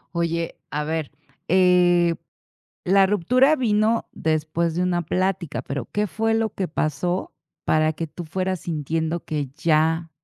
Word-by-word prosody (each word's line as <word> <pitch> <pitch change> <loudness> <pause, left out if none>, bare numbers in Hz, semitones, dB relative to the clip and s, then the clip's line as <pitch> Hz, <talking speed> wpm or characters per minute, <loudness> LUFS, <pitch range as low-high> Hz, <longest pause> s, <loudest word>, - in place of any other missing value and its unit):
Oye, 170 0 -2
a 150 +1 -2
ver, 160 -1 -3 0.4
eh, 175 -1 +4 0.7
la 195 +1 +4
ruptura 250 - +3
vino 225 -3 +1
después 160 +1 -1
de 180 - 0
una 175 -1 0
plática, 180 -1 -1
pero, 135 -3 -4
¿qué 210 0 0
fue 225 +3 0
lo 225 -1 +1
que 190 - -2
pasó 165 +4 -2 0.3
para 155 0 +2
que 165 0 -5
tú 175 +3 -8
fueras 185 +2 -2
sintiendo 160 +1 -2
que 145 -4 -3
ya 160 +1 +2
170 Hz, 140 wpm, -23 LUFS, 160-190 Hz, 0.7 s, eh